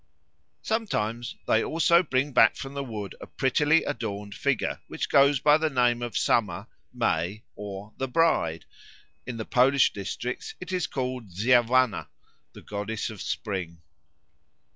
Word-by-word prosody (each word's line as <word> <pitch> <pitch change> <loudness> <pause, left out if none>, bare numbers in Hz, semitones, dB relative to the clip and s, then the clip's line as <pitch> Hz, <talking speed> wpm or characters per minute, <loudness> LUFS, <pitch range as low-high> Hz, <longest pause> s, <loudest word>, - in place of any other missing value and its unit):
Sometimes 120 - -2
they 110 - +3
also 170 +2 +4
bring 140 -3 0
back 115 - +6
from 135 0 -7
the 140 0 -3
wood 105 -6 -6
a - - -8
prettily 150 +4 +2
adorned 105 -7 -4
figure, 140 +1 -1
which - - -4
goes 140 0 +5
by 150 +3 +5
the 160 0 +1
name 120 -3 +2
of 120 -1 -3
Summer, 100 -4 +1 0.3
May, 105 -4 -1
or 100 +1 -8
the 135 - -2
Bride; 125 - +1 0.6
in 125 -2 -5
the 110 - -4
Polish 130 +2 +4
districts 105 +5 -5
it 185 0 -7
is 180 -3 0
called 125 -4 -4
Dziewanna, 120 +4 +3 0.5
the - - -13
goddess 105 +2 -4
of 105 - -9
spring. 90 -5 -4
120 Hz, 140 wpm, -26 LUFS, 105-140 Hz, 0.6 s, back